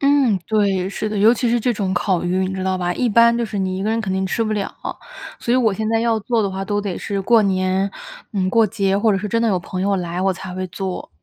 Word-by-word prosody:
嗯， 275 -7 +3
对， 200 -4 +1
是 215 +2 -3
的， 210 - -3
尤 215 +4 +6
其 245 0 0
是 240 0 +2
这 245 +1 +1
种 195 -3 -2
烤 185 -1 0
鱼， 180 +1 0
你 - - -4
知 190 0 -3
道 190 0 0
吧。 180 -1 -1
一 250 - 0
般 235 +2 +5
就 235 - 0
是 210 -2 -4
你 185 -1 -1
一 190 - -3
个 210 - -1
人 225 +1 0
肯 195 -4 -3
定 190 0 0
吃 225 +4 -1
不 215 - -1
了， 205 -2 -2 0.7
所 235 - -1
以 255 - +4
我 225 -5 +3
现 215 +2 -2
在 225 0 +2
要 230 -1 +1
做 230 +1 0
的 200 - -1
话， 190 0 -4
都 205 +1 -1
得 200 -3 -4
是 200 -1 -3
过 225 +2 +4
年， 190 0 +1 0.4
嗯， 185 -2 0
过 225 +1 +4
节， 195 -1 0
或 215 0 +3
者 195 - +1
是 210 - -4
真 230 +3 +1
的 230 - +2
有 185 -3 +2
朋 185 +1 -5
友 200 +1 +1
来 175 0 -3
我 190 0 +2
才 185 0 -8
会 185 0 -3
做。 185 0 -5
200 Hz, 310 characters per minute, -20 LUFS, 190-225 Hz, 0.7 s, 尤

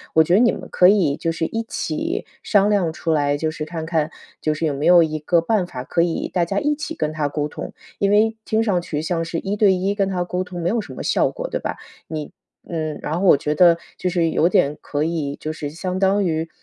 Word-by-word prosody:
我 160 - +7
觉 170 - 0
得 195 - +6
你 240 - +5
们 - - -7
可 180 - +5
以 180 -9 +3
就 165 +2 -2
是 165 0 -2
一 225 +7 -2
起 225 - -3 0.2
商 205 -1 +3
量 195 -6 +2
出 165 0 -1
来， 145 -1 +1
就 155 +2 -1
是 155 -1 -5
看 160 +1 -5
看， 160 -2 0 0.3
就 155 - +1
是 155 +2 -2
有 150 - 0
没 140 +2 -3
有 175 0 +7
一 155 -1 0
个 170 +3 +2
办 190 +3 +1
法， 130 -7 -7
可 170 - +1
以 170 -1 0
大 180 - 0
家 195 +4 -1
一 295 +5 +1
起 300 - -5
跟 155 0 -2
他 150 -2 -1
沟 145 0 -2
通。 - - -7 0.3
因 200 0 +2
为 220 +2 +3
听 220 0 +1
上 190 -6 +1
去 150 -3 -3
像 165 +1 -1
是 165 0 -3
一 195 +1 -2
对 205 -2 +4
一 190 +2 -1
跟 195 -2 +1
他 180 -2 -1
沟 180 +1 -2
通 180 -1 -7
没 165 - -1
有 225 +2 0
什 - - -10
么 - - -6
效 - - +2
果， - - -6
对 - - -3
吧？ - - -4 0.3
你 155 -2 -6 0.4
嗯， 155 -3 -3
然 155 - -2
后 - - +1
我 145 - +7
觉 150 +2 -2
得 170 -1 +6 0.2
就 180 - -1
是 170 -2 +1
有 170 - +3
点， 150 -7 +2
可 145 +1 -2
以， 155 -4 -2
就 155 - -4
是 150 -2 -5
相 180 +4 -4
当 195 +1 +2
于， 160 -1 -1
170 Hz, 280 characters per minute, -21 LUFS, 155-195 Hz, 0.4 s, 我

